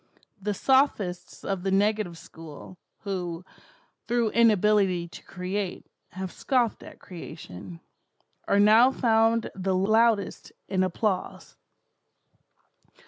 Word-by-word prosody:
The 205 Hz, +1 st, -2 dB
sophists 240 Hz, -9 st, 0 dB
of 195 Hz, -2 st, -2 dB
the 195 Hz, -, -2 dB
negative 205 Hz, -2 st, +1 dB
school, 165 Hz, +3 st, -12 dB, 0.2 s
who, 180 Hz, -3 st, -4 dB, 0.6 s
through 235 Hz, -2 st, +1 dB
inability 210 Hz, -5 st, +3 dB
to -, -, -12 dB
create, 185 Hz, +1 st, -4 dB, 0.3 s
have 185 Hz, 0 st, -5 dB
scoffed 245 Hz, -5 st, 0 dB
at -, -, -12 dB
creation, 100 Hz, -, -10 dB, 0.7 s
are 200 Hz, -, +3 dB
now 220 Hz, +5 st, +7 dB
found 225 Hz, -3 st, +2 dB
the 190 Hz, 0 st, -1 dB
loudest 215 Hz, +2 st, +1 dB
in 190 Hz, -2 st, 0 dB
applause. 185 Hz, +1 st, -2 dB
195 Hz, 100 wpm, -26 LUFS, 180-220 Hz, 0.7 s, now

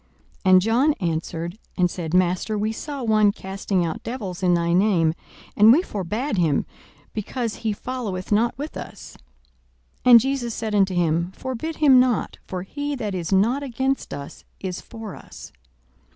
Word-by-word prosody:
42:009:049 185 Hz, -, +5 dB
And 185 Hz, 0 st, +8 dB
John 245 Hz, +8 st, +3 dB
answered 170 Hz, -, -3 dB, 0.2 s
and 180 Hz, -2 st, +2 dB
said, 165 Hz, -3 st, -5 dB
Master, 185 Hz, +4 st, +1 dB
we 215 Hz, +1 st, 0 dB
saw 280 Hz, +3 st, -6 dB
one 215 Hz, -2 st, +4 dB
casting 190 Hz, -2 st, -2 dB
out 160 Hz, -, -4 dB
devils 200 Hz, -8 st, -5 dB
in 180 Hz, -2 st, +3 dB
thy 170 Hz, 0 st, +1 dB
name; 175 Hz, -4 st, +3 dB, 0.4 s
and 215 Hz, +2 st, +7 dB
we 315 Hz, +9 st, +5 dB
forbad 210 Hz, -, -3 dB
him, 155 Hz, -5 st, +2 dB, 0.5 s
because 225 Hz, +2 st, -3 dB
he 220 Hz, -, -1 dB
followeth 210 Hz, -4 st, -5 dB
not 225 Hz, +3 st, +2 dB
with 295 Hz, +3 st, -6 dB
us. -, -, -9 dB, 0.9 s
42:009:050 -, -, +8 dB
And 235 Hz, -, +11 dB
Jesus 250 Hz, -2 st, -2 dB
said 220 Hz, -2 st, -3 dB
unto 195 Hz, -2 st, +2 dB
him, 170 Hz, +1 st, +1 dB
Forbid 260 Hz, +5 st, -4 dB
him 275 Hz, -5 st, +6 dB
not: 250 Hz, -3 st, +1 dB
for 180 Hz, -1 st, -4 dB
he 290 Hz, +8 st, -4 dB
that 215 Hz, -6 st, -3 dB
is 175 Hz, -2 st, -3 dB
not 225 Hz, +8 st, +3 dB
against 265 Hz, 0 st, -2 dB
us 140 Hz, 0 st, -8 dB, 0.2 s
is 185 Hz, -2 st, -5 dB
for 225 Hz, -3 st, -9 dB
us. -, -, -12 dB
210 Hz, 165 wpm, -23 LUFS, 180-250 Hz, 0.9 s, And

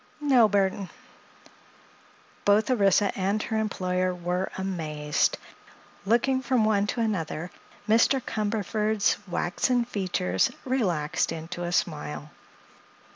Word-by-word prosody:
"No, 260 Hz, -7 st, +4 dB
Burthon." 195 Hz, -1 st, 0 dB, 1.5 s
Both 210 Hz, +5 st, +3 dB
Orissa 200 Hz, -3 st, +3 dB
and 200 Hz, +2 st, 0 dB
her 220 Hz, -, -2 dB
employer 185 Hz, -3 st, -1 dB
were 180 Hz, +2 st, -2 dB
amazed. 155 Hz, -6 st, -1 dB, 0.7 s
Looking 260 Hz, +4 st, +2 dB
from 255 Hz, -4 st, +2 dB
one 205 Hz, -1 st, +2 dB
to 235 Hz, -, -2 dB
another, 175 Hz, -5 st, -2 dB, 0.4 s
Mr. 230 Hz, +5 st, +4 dB
Cumberford's 215 Hz, -1 st, 0 dB
waxen 235 Hz, +8 st, 0 dB
features 180 Hz, -, 0 dB, 0.2 s
relaxed 185 Hz, -, 0 dB
into 165 Hz, +2 st, -6 dB
a 175 Hz, -, -3 dB
smile. 150 Hz, -3 st, -2 dB
200 Hz, 100 wpm, -26 LUFS, 175-220 Hz, 1.5 s, No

